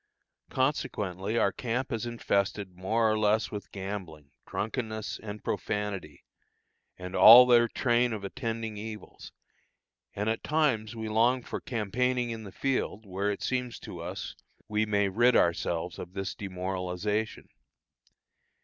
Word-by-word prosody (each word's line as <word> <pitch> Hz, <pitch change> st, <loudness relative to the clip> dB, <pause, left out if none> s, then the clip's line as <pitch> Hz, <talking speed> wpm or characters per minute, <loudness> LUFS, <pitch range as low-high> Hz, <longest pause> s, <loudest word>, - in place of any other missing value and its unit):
Consequently 105 Hz, -, -1 dB
our 100 Hz, -, +3 dB
camp 125 Hz, +5 st, -3 dB
is 115 Hz, 0 st, -2 dB
infested 100 Hz, -4 st, -1 dB
more 110 Hz, +5 st, +1 dB
or 110 Hz, 0 st, +2 dB
less 110 Hz, +1 st, +2 dB
with 105 Hz, -2 st, -7 dB
gambling, 95 Hz, -7 st, -6 dB, 0.2 s
drunkenness, 110 Hz, -1 st, -3 dB
and 105 Hz, -1 st, -7 dB
profanity, 100 Hz, -8 st, -3 dB, 0.7 s
and 90 Hz, +1 st, -7 dB
all 120 Hz, +3 st, +11 dB
their 120 Hz, -1 st, +5 dB
train 120 Hz, +1 st, +1 dB
of 105 Hz, -2 st, -4 dB
attending 115 Hz, 0 st, -4 dB
evils, 110 Hz, 0 st, -8 dB, 0.8 s
and 105 Hz, +1 st, -2 dB
at 110 Hz, 0 st, 0 dB
times 125 Hz, -8 st, +1 dB
we 110 Hz, -1 st, -4 dB
long 120 Hz, +4 st, +2 dB
for -, -, -5 dB
campaigning 125 Hz, +1 st, -1 dB
in 110 Hz, -1 st, -6 dB
the 100 Hz, -, -9 dB
field, 125 Hz, -4 st, -2 dB
where 100 Hz, +1 st, -2 dB
it 100 Hz, -, -3 dB
seems 125 Hz, -2 st, -2 dB
to -, -, -8 dB
us -, -, -6 dB, 0.3 s
we 110 Hz, 0 st, 0 dB
may 100 Hz, -1 st, +2 dB
rid 120 Hz, +6 st, +3 dB
ourselves 85 Hz, 0 st, +1 dB
of 90 Hz, -, -8 dB
this 95 Hz, -1 st, -3 dB
demoralization. 95 Hz, +2 st, -3 dB
110 Hz, 135 wpm, -29 LUFS, 100-120 Hz, 0.8 s, all